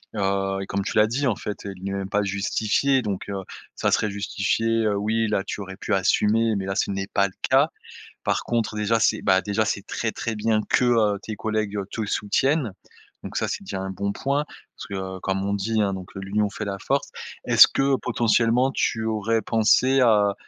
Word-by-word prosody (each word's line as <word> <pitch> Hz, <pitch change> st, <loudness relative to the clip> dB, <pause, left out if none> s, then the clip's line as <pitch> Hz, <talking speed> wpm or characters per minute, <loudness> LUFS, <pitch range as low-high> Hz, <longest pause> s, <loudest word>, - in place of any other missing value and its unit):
Heu 95 Hz, -1 st, 0 dB
et 95 Hz, -, -6 dB
comme 100 Hz, 0 st, -2 dB
tu -, -, -4 dB
l'as 105 Hz, 0 st, +6 dB
dit 135 Hz, +6 st, -1 dB
en 120 Hz, -6 st, +2 dB
fait: 105 Hz, +1 st, -6 dB
«Il 90 Hz, -, -14 dB
n'est 100 Hz, -, -2 dB
même 95 Hz, -1 st, -4 dB
pas 105 Hz, -, +1 dB
justifié» 105 Hz, +7 st, +1 dB
donc, 100 Hz, -5 st, -4 dB
heu, 100 Hz, -1 st, -4 dB, 0.3 s
ça -, -, 0 dB
serait 105 Hz, -2 st, +1 dB
justifié, 110 Hz, +3 st, 0 dB
heu, 105 Hz, -1 st, +1 dB
oui, 110 Hz, +2 st, 0 dB
là 105 Hz, -2 st, 0 dB
tu 100 Hz, -, -5 dB
aurais 95 Hz, -1 st, -8 dB
pu -, -, -3 dB
assumer 105 Hz, +4 st, +2 dB
mais 95 Hz, -, -2 dB
là 95 Hz, -, -2 dB
ce -, -, 0 dB
n'est 95 Hz, 0 st, -3 dB
pas 100 Hz, 0 st, +2 dB
le 95 Hz, -, -5 dB, 0.2 s
cas. -, -, +4 dB, 0.6 s
Par -, -, 0 dB
contre 115 Hz, -2 st, -1 dB
déjà 105 Hz, +2 st, +1 dB
c'est -, -, +2 dB
bah, 95 Hz, -1 st, +4 dB
déjà 105 Hz, +1 st, 0 dB
c'est 100 Hz, -2 st, -3 dB
très, 115 Hz, -, -2 dB
très 115 Hz, +1 st, -4 dB
bien 110 Hz, 0 st, +1 dB
que, -, -, +3 dB
heu, 110 Hz, -4 st, +3 dB
tes 110 Hz, -1 st, -6 dB
collègues, 110 Hz, -2 st, -2 dB
heu, 100 Hz, -2 st, -3 dB
te 110 Hz, +1 st, -3 dB
soutiennent. 125 Hz, +5 st, 0 dB, 0.5 s
Donc -, -, -7 dB
ça, -, -, 0 dB
c'est -, -, -4 dB
déjà 95 Hz, -, -5 dB
1 95 Hz, -, -4 dB
bon 100 Hz, +1 st, -2 dB
point. 140 Hz, +5 st, -1 dB, 0.3 s
Parce -, -, -8 dB
que 95 Hz, -1 st, -5 dB
comme 95 Hz, +1 st, -1 dB
on 100 Hz, 0 st, 0 dB
dit 110 Hz, +2 st, 0 dB
hein, 100 Hz, -2 st, +1 dB
donc, 95 Hz, -1 st, -7 dB
heu: -, -, -4 dB
«l'union 100 Hz, +2 st, 0 dB
fait 110 Hz, -, -5 dB
la 100 Hz, -1 st, -4 dB
force». -, -, -1 dB, 0.3 s
Est-ce -, -, +8 dB
que 135 Hz, 0 st, +2 dB
potentiellement 120 Hz, +1 st, +2 dB
tu 110 Hz, -4 st, 0 dB
aurais 110 Hz, +1 st, 0 dB
pensé 120 Hz, +5 st, +3 dB
à 105 Hz, -5 st, +4 dB
105 Hz, 220 wpm, -24 LUFS, 100-115 Hz, 0.6 s, Est-ce